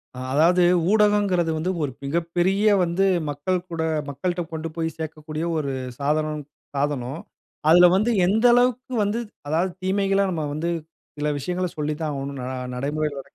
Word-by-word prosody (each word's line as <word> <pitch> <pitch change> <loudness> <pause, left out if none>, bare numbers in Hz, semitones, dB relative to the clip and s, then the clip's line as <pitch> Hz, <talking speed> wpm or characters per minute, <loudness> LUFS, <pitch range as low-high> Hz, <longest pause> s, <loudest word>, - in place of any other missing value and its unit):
ஆ. - - -7
அதாவது 170 +5 +4 0.3
ஊடகங்கிறது 205 -5 +3
வந்து, 170 +4 -1
ஒரு 140 - -1
மிகப்பெரிய 175 +6 0 0.2
வந்து 175 +3 +1 0.2
மக்கள்கூட 170 +3 -2 0.3
மக்கள்ட்ட 175 +6 -2
கொண்டு 160 +1 -4
போயி 165 -1 -1
சேர்க்கக்கூடிய 155 0 -5
ஒரு 140 -3 -1 0.3
சாதனம், 150 +1 0 0.3
சாதனம். 140 0 -2 0.5
அதில 175 +2 +8
வந்து 215 +5 +2 0.2
எந்த 220 +5 +2
அளவுக்கு 250 +2 +2
வந்து 205 +3 0 0.3
அதாவது 165 +5 +1
தீமைகள, 195 +1 +1
நம்ம 165 -3 -2
வந்து 160 +3 -2 0.5
சில 150 0 -1
விஷயங்கள 180 +5 -2
சொல்லித்தான் 150 +1 -2
ஆவணும். 140 0 -5
ந - - -5 0.3
நடைமுறையில 145 +2 -2
165 Hz, 135 wpm, -23 LUFS, 150-185 Hz, 0.5 s, அதில